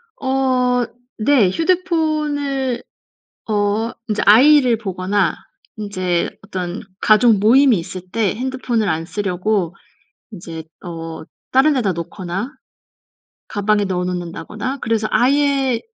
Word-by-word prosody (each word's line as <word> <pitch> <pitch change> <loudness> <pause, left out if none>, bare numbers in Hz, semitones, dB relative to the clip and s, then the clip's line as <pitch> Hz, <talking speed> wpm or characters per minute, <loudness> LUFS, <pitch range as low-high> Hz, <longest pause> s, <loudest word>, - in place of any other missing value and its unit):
어. 255 -2 +1 0.3
네. 225 -5 +4
휴대폰을 305 - 0 0.7
어 210 +2 0 0.2
인제 210 -1 0
아이를 250 +2 +6
보거나 190 -2 -1 0.4
인제 185 -5 -1
어떤 185 -2 -5 0.2
가족 215 0 +5
모임이 240 +3 +5
있을 180 +2 -6
때 220 -4 +1
핸드폰을 250 -3 -1
안 160 0 0
쓰려고 190 -1 -1 0.6
인제 165 -4 -8 0.2
어 165 -2 -6 0.3
다른 275 +4 +4
데다 225 -8 +1
놓거나 180 - -5 1.0
가방에 205 0 +1
넣어 180 -2 -1
놓는다거나 180 +8 -4
그래서 225 -2 0
아예 270 +1 +2
215 Hz, 225 characters per minute, -19 LUFS, 185-260 Hz, 1.0 s, 아이를